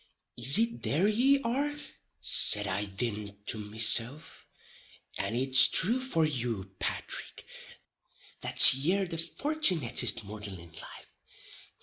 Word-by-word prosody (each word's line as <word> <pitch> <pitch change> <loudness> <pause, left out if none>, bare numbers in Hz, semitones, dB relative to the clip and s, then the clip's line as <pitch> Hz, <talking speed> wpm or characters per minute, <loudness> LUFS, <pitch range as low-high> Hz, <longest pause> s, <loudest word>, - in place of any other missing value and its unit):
"Is 130 +4 +3
it 230 +1 -1
there 170 +8 0
ye 265 +6 +1
are?" 280 +5 -3 0.4
said 105 -1 0
I 100 +1 -3
thin 105 0 -5
to 110 - -5
mesilf, 115 +7 -1 0.7
"and - - -3
it's 130 +1 +4
thrue 230 +8 -1
for 210 -12 -1
you, 120 -9 -4
Pathrick, - - -6 0.9
that - - +8
ye're 175 +9 0
the 165 -2 -6
fortunittest 170 - 0
mortal 105 -1 -9
in 85 -1 -15
life. 80 - -13
130 Hz, 115 wpm, -28 LUFS, -, 0.9 s, that